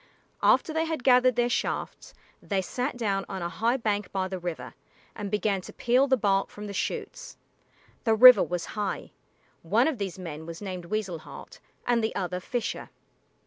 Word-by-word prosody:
After 315 - +3
they 320 +1 +1
had 320 -5 -3
gathered 250 -1 +5
their 240 0 +2
shafts, 245 - -3 0.3
they 200 -2 -1
sat 250 +7 -3
down 200 -4 0
on 190 -3 -4
a 170 - -2
high 230 +7 0
bank 210 -4 -2
by 190 -2 -1
the 190 -1 -5
river 175 -2 -5 0.4
and 205 -2 -5
began 205 -1 0
to - - -10
peel 250 +3 +2
the 265 -1 +3
bark 195 -3 +1
from 210 - -9
the 200 - -6
shoots. - - -4 0.7
The 225 -2 +3
river 250 +3 +10
was 175 -1 -2
high. 205 -2 -3 0.5
One - - +2
of 295 -8 -2
these 195 -2 -4
men 160 -3 -7
was 165 0 -7
named 185 -4 -6
Weasel 190 -3 -3
Heart - - -12 0.3
and 235 -2 +2
the 220 - -1
other 180 -1 -2
Fisher. 235 +5 -4
210 Hz, 185 wpm, -27 LUFS, 185-245 Hz, 0.7 s, river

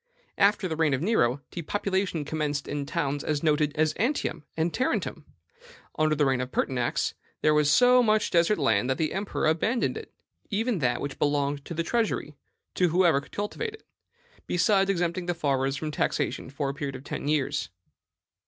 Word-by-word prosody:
After 200 -1 +3
the 160 - -3
reign 155 -3 +2
of 130 - -4
Nero, 140 - +2
depopulation 190 -2 -2
commenced 150 -2 -2
in 145 -1 -3
towns 145 0 -1
as 150 -1 -1
noted 150 -1 +2
as 155 0 +2
Antium 235 - -1
and 165 +1 0
Tarentum. 255 - -1 0.7
Under 155 0 +2
the 145 0 +2
reign 130 -2 +1
of 125 0 -5
Pertinax, 125 -2 0 0.3
there 155 - +5
was 150 -1 +3
so 250 +6 +6
much 215 -2 +2
desert 170 +5 +3
land 125 -5 +2
that 130 - +1
the 155 -2 -1
emperor 195 -2 -2
abandoned 170 +10 +1
it, - - -9 0.4
even 225 0 0
that 125 -4 0
which 140 -1 -5
belonged 145 -1 0
to 170 - -6
the 165 - 0
treasury, 215 -8 -1 0.4
to 180 -1 +2
whoever 170 -3 +4
would 140 - -14
cultivate 430 - -4
it, 440 - -21 0.6
besides 195 +2 +3
exempting 175 -1 -1
the 175 - 0
farmers 135 -3 0
from 155 +1 -4
taxation 140 - -1
for 140 +1 -2
a - - -3
period 140 -1 -4
of 130 - -9
ten 145 - -5
years. 145 -1 0
155 Hz, 180 wpm, -27 LUFS, 140-190 Hz, 0.7 s, so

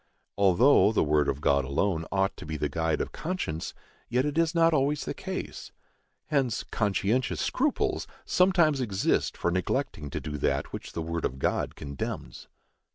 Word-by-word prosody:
Although 100 +5 +5
the - - +3
word 75 -1 +2
of 70 - -2
God 70 -1 +3
alone 80 +5 0
ought 95 0 +1
to - - -9
be 80 -1 -3
the 75 - 0
guide 80 +2 0
of - - -3
conscience, 155 - -4 0.3
yet 125 +3 +2
it 145 -1 -2
is 165 0 +2
not 165 0 +5
always 145 0 +1
the - - -3
case. - - -6 0.5
Hence, 135 -7 0
conscientious 105 +4 0
scruples 285 +2 0 0.2
sometimes 170 -6 +3
exist 100 -6 0
for 85 - 0
neglecting 85 -4 -1
to - - -3
do 75 -1 -5
that - - -1
which - - -7
the 85 - -3
word 85 0 -3
of 65 - -2
God - - -1
condemns. 70 -3 -6
100 Hz, 165 wpm, -28 LUFS, -, 0.5 s, Although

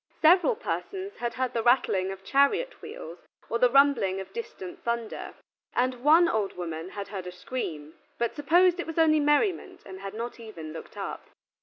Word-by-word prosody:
Several 360 +8 +6
persons 400 -3 -4
had 240 -1 -3
heard 255 -1 -1
the 230 - 0
rattling 220 -6 +3
of 195 0 -9
chariot 345 - +2
wheels 165 +2 -9 0.3
or 235 - +1
the 250 0 +5
rumbling 260 -8 +4
of 190 - -8
distant 380 -6 -7
thunder: 235 -3 -3 0.4
and 250 0 0
one 325 +4 +6
old 215 - 0
woman 165 -1 -5
had 200 0 -7
heard 190 -3 -6
a - - -5
scream, 165 -6 -5 0.2
but 235 0 -1
supposed 350 +5 +4
it 345 - -3
was 325 - -6
only 315 -1 +5
merriment, 295 +6 +1
and 190 -1 -9
had 195 +1 -7
not 235 +2 -5
even 170 -9 -8
looked 160 - -10
up. - - -6
245 Hz, 180 wpm, -27 LUFS, 195-325 Hz, 0.4 s, Several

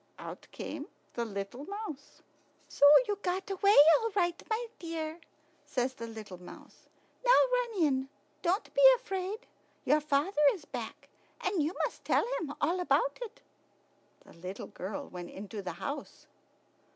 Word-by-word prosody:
Out - - -9
came - - -6 0.3
the 235 - -2
little 200 +6 -5
mouse. 400 -8 -7 0.4
"So - - -4 0.2
you 410 -1 -1
got 375 +2 -2
away 395 +2 +4 0.2
all 455 -1 -1
right, 350 -3 +1
my 450 +2 0
dear," 325 -1 -4 0.4
says 260 -3 -1
the 235 -3 -7
little 215 -5 -9
mouse. 180 - -14 0.4
"Now - - 0 0.2
run 475 -7 +1
in. 265 -3 +1 0.3
Don't 370 +5 0
be - - +2
afraid. 395 -1 -4 0.4
Your 300 +3 +4
father 300 +3 +1
is 325 -6 -12
back, - - -7 0.3
and 370 -2 0
you 310 +5 -1
must - - -7
tell - - +2
him 295 -3 -5
all 355 +2 +1
about 485 +8 +1
it." 480 +1 -7 0.8
The - - -16
little 185 +5 -7
girl 195 +1 -6
went 175 -1 -8
into 205 +2 -7
the 185 - -5
house. 280 0 -6
315 Hz, 150 wpm, -31 LUFS, 245-395 Hz, 0.8 s, away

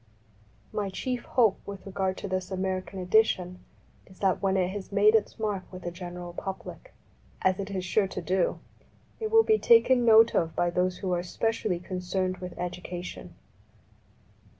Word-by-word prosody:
My 205 -2 -1
chief 245 +6 -3
hope 225 -6 +3
with 200 -1 -8
regard 190 -1 -2
to - - -5
this 185 -1 -2
American 190 0 -3
edition 180 -2 +2 0.5
is 185 - -17
that 190 -2 +1
when 195 -1 +2
it 180 -1 +1
has 200 0 -7
made 205 +2 +5
its 220 -2 +1
mark 205 -4 -3
with 185 -1 -9
the 175 - -3
general 175 0 -7
public, 195 - -7 0.5
as 190 0 +2
it 200 0 -4
is 190 -2 -3
sure 195 +2 +2
to 185 - -5
do, 185 0 0 0.6
it 440 -1 -2
will 450 0 +6
be 435 -1 +3
taken 260 - +5
note 225 0 +7
of 165 -1 0
by 175 0 +1
those 180 +1 0
who 190 -2 -3
are 175 - 0
specially 215 +1 -1
con 185 +1 -6
cerned 185 +1 -2
with 180 -1 -7
education. 180 0 -6
190 Hz, 175 wpm, -28 LUFS, 180-210 Hz, 0.6 s, note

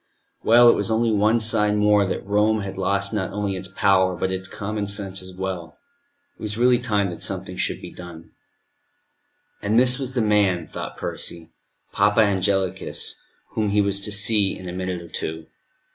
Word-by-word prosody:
Well, 120 +2 +6
it 120 - +8
was - - +1
only 115 +1 +2
one 110 +2 +3
sign 105 -1 +2
more 105 -1 +4
that 95 - -4
Rome 105 +2 +2
had 95 -1 -6
lost 100 +2 0
not 100 -3 -2
only 100 -1 -2
its 95 0 -4
power, 95 0 +2
but 95 +2 -2
its 95 0 -4
common 105 +1 -4
sense 100 -1 -2
as 95 0 -8
well. 95 -3 -5 0.6
It - - -17
was 105 0 -4
really 125 0 +4
time 105 -6 0
that 85 - -9
something - - -4
should - - -2
be - - -9
done. 85 -2 -11 1.3
And 105 +2 +1
this 125 +1 +4
was 135 -1 -4
the 120 - +2
man, 100 -5 +2
thought - - -7
Percy, 85 -1 -4 0.4
Papa 105 +2 +3
Angelicus, 95 -2 0 0.4
whom 110 -2 -1
he 105 +1 +3
was 100 0 0
to 105 +1 -3
see 100 -1 +1
in 95 - -9
a 90 - -5
minute 90 -1 -4
or - - -11
two. 80 0 -5
100 Hz, 185 wpm, -23 LUFS, 95-105 Hz, 1.3 s, it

